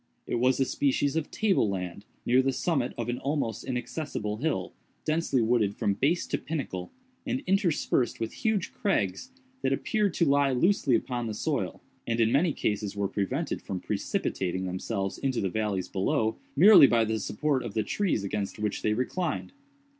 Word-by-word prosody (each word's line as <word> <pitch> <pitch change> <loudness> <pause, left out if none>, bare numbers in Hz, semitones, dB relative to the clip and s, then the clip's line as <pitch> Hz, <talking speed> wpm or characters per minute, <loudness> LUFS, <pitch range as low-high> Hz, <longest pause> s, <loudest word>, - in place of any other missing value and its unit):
It 120 - -1
was 130 +2 +3
a 135 - +3
species 140 +2 +1
of 160 -2 -1
table 200 - +2
land, 95 +1 -4 0.2
near 125 +2 +5
the 135 +1 +1
summit 135 -2 -1
of 115 - -3
an 120 0 -2
almost 140 -5 -2
inaccessible 125 -4 -3
hill, 155 +6 -2 0.3
densely 155 -6 +1
wooded 110 -3 +2
from 100 - +1
base 145 - +1
to - - -2
pinnacle, 130 - -4 0.3
and 260 +2 -2
interspersed 180 - +1
with 115 -1 -3
huge 215 -5 -1
crags 195 - -1 0.3
that - - +1
appeared 210 -5 0
to 170 - +3
lie 140 -1 +3
loosely 140 -2 +3
upon 120 -2 -2
the 110 - -4
soil, - - -2 0.2
and 115 0 0
in 115 0 +3
many 155 +6 +3
cases 105 -5 -2
were 100 -1 0
prevented 115 - -2
from 95 - -4
precipitating 95 +1 -2
themselves 95 +2 -3
into 130 -3 0
the 95 - 0
valleys 100 -3 -1
below, 110 +4 0 0.2
merely 190 -2 +9
by 115 -2 +3
the 110 0 -1
support 135 +6 0
of 100 - -6
the 110 - +1
trees 190 - 0
against 100 0 -3
which 105 -1 -2
they 105 - +1
reclined. 155 +9 -2
125 Hz, 175 wpm, -28 LUFS, 105-155 Hz, 0.3 s, merely